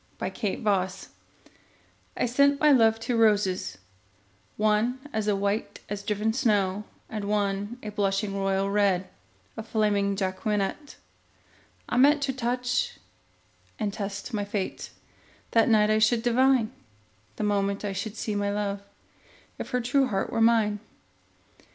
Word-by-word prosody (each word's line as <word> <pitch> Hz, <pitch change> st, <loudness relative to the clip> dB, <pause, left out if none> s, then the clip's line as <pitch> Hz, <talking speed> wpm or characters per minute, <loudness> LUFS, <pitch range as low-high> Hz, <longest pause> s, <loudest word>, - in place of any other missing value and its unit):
The -, -, -4 dB
White 210 Hz, -, -2 dB
Flag 190 Hz, -3 st, +2 dB, 1.3 s
I -, -, +1 dB
sent 280 Hz, +4 st, +3 dB
my 300 Hz, -1 st, +5 dB
love 225 Hz, -4 st, +4 dB
two 235 Hz, +2 st, -2 dB
roses, 200 Hz, -, +2 dB, 0.8 s
one 215 Hz, +4 st, +2 dB, 0.2 s
As 215 Hz, -1 st, 0 dB
white 200 Hz, +2 st, -1 dB
as 205 Hz, 0 st, -4 dB
driven 210 Hz, +2 st, -1 dB
snow, 210 Hz, -5 st, +1 dB, 0.2 s
And 215 Hz, -2 st, -5 dB
one 205 Hz, +2 st, -1 dB
a 210 Hz, -, -4 dB
blushing 200 Hz, 0 st, -1 dB
royal 195 Hz, 0 st, 0 dB
red, 195 Hz, -3 st, +2 dB, 0.5 s
A 225 Hz, -, -5 dB
flaming 210 Hz, -3 st, +1 dB
Jacqueminot. 200 Hz, +7 st, -2 dB, 0.9 s
I -, -, -1 dB
meant 285 Hz, +3 st, +5 dB
to 270 Hz, -1 st, 0 dB
touch 250 Hz, -, -1 dB, 0.8 s
and 210 Hz, -3 st, -2 dB
test 200 Hz, +3 st, -5 dB
my 205 Hz, -2 st, -1 dB
fate; 200 Hz, -1 st, -4 dB, 0.6 s
That 230 Hz, 0 st, +4 dB
night 215 Hz, -1 st, +4 dB
I 215 Hz, -, +3 dB
should 225 Hz, +1 st, +3 dB
divine, 250 Hz, -1 st, +3 dB, 0.6 s
The -, -, -4 dB
moment 200 Hz, 0 st, 0 dB
I 200 Hz, -, -2 dB
should 210 Hz, +3 st, -5 dB
see 215 Hz, -, -3 dB
my 205 Hz, 0 st, 0 dB
love, 200 Hz, -1 st, -2 dB, 0.8 s
If -, -, -5 dB
her 250 Hz, -2 st, 0 dB
true 260 Hz, +3 st, +2 dB
heart 195 Hz, -4 st, -2 dB
were 225 Hz, -, 0 dB
mine. 225 Hz, -2 st, +3 dB
210 Hz, 140 wpm, -27 LUFS, 200-230 Hz, 1.3 s, my